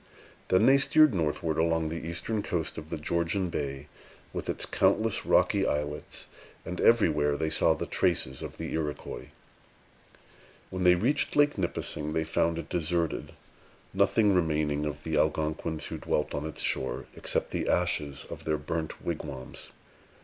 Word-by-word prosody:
Then 95 - +4
they 135 +1 +6
steered 155 0 +5
northward, 80 -2 0
along 80 -1 +2
the 80 +1 -5
eastern 85 +6 -2
coast 85 -6 -2
of 80 0 -11
the 80 - -3
Georgian 85 +4 0
Bay, 70 -2 -3 0.5
with - - -4
its - - -2
countless - - +1
rocky - - +4
islets; 75 0 -3 0.4
and 90 - -4
everywhere 75 -10 +4
they 80 +1 -1
saw - - +3
the - - -3
traces 65 0 0
of - - -7
the - - -5
Iroquois. 75 -3 -4 1.4
When 95 -1 -2
they 90 0 +7
reached 135 +11 +1
Lake 145 0 +4
Nipissing, 75 -4 -2
they 80 - +1
found 85 +1 +1
it 85 -1 -5
deserted, 85 -2 -1 0.6
nothing 105 -3 +3
remaining 75 -4 +1
of 75 0 -6
the 80 -1 -1
Algonquins 80 +1 0
who - - -5
dwelt 75 - -1
on 75 +2 -2
its 80 - -4
shore, 65 - -1
except - - -1
the - - -1
ashes 75 -6 0
of - - -8
their 75 -1 +1
burnt 80 +2 -4
wigwams. 75 -6 -5
80 Hz, 155 wpm, -29 LUFS, 75-90 Hz, 1.4 s, they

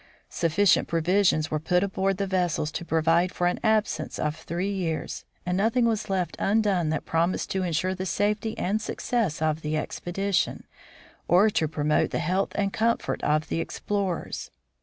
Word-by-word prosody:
Sufficient 170 +4 +3
provisions 165 -2 +2
were 155 - 0
put 180 +4 +1
aboard 195 -1 0
the 200 - 0
vessels 175 -5 0
to 170 - -4
provide 165 +2 +2
for 175 - -1
an 175 - +1
absence 220 -2 0
of 150 0 -1
three 175 +5 -3
years, 175 -5 -3 0.2
and 180 0 0
nothing 225 +5 +2
was 220 -3 0
left 185 -2 -1
undone 195 -5 +2
that 155 -1 -2
promised 170 +2 0
to 190 - 0
insure 180 +1 0
the 190 0 -4
safety 210 +5 0
and 210 +4 0
success 215 - -1
of 155 0 0
the 155 0 -1
expedition, 195 +5 -1 0.6
or 195 +5 +5
to 160 - +1
promote 150 0 +1
the - - -2
health 185 +4 0
and 200 -1 0
comfort 230 +1 0
of 155 +1 +1
the - - -1
explorers. 195 +1 -3
180 Hz, 165 wpm, -26 LUFS, 160-200 Hz, 0.6 s, or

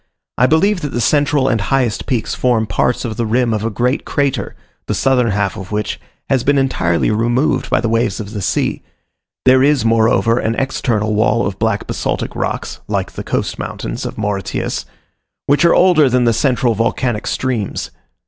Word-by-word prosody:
I 125 - +5
believe 180 +6 +2
that 145 - -4
the 120 - -1
central 145 +2 +2
and 115 - +1
highest 125 -1 0
peaks 120 -5 -1
form 120 -3 +1
parts 125 +4 0
of 110 -2 -4
the 115 - 0
rim 120 +1 +1
of 105 -1 -2
a 115 - 0
great 125 +6 -1
crater, 140 -8 -1 0.3
the - - -1
southern 125 -3 +2
half 100 -2 -1
of 95 -2 -8
which 105 0 -2 0.3
has 130 -3 +1
been 140 +2 +2
entirely 100 -11 +1
removed 120 +6 +1
by - - +2
the - - 0
waves 115 +2 0
of 105 -2 -6
the 105 -2 -5
sea: - - -1 0.6
there 130 0 +6
is, 140 -4 +3
moreover, 115 +1 +3
an 115 +1 -1
external 115 -5 -1
wall 110 +2 +2
of 95 - -4
black - - 0
basaltic - - -3
rocks, - - -3
like - - -2
the - - -7
coast - - -2
mountains - - -5
of - - -5
Mauritius, 100 -3 -3 0.6
which 145 +3 +2
are 170 - +5
older 175 -6 +5
than 125 0 +2
the 115 -1 +3
central 125 0 +1
volcanic 115 +1 -1
streams. 120 -6 -2
120 Hz, 185 wpm, -17 LUFS, 110-135 Hz, 0.6 s, there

